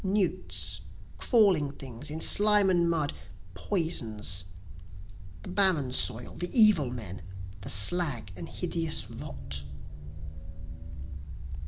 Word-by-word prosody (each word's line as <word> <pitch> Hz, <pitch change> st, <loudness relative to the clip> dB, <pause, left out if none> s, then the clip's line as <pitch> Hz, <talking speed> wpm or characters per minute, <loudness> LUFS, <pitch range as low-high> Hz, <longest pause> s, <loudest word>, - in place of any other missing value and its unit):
Newts, 195 Hz, 0 st, -2 dB, 0.4 s
crawling 190 Hz, -, +3 dB
things 125 Hz, -3 st, -6 dB
in 155 Hz, +2 st, -5 dB
slime 205 Hz, -2 st, +5 dB
and 170 Hz, -1 st, +2 dB
mud, 155 Hz, -4 st, -1 dB, 0.4 s
poisons, 110 Hz, -, -1 dB, 1.0 s
The -, -, -9 dB
barren 180 Hz, -9 st, +1 dB
soil, 120 Hz, -2 st, +1 dB
the 175 Hz, -, -3 dB
evil 200 Hz, -, +5 dB
men, 105 Hz, -7 st, -8 dB, 0.4 s
the -, -, -7 dB
slag 120 Hz, -, +3 dB
and 90 Hz, -, -9 dB
hideous 165 Hz, -3 st, -2 dB
rot. 70 Hz, 0 st, -7 dB
155 Hz, 100 wpm, -28 LUFS, 115-185 Hz, 1.0 s, slime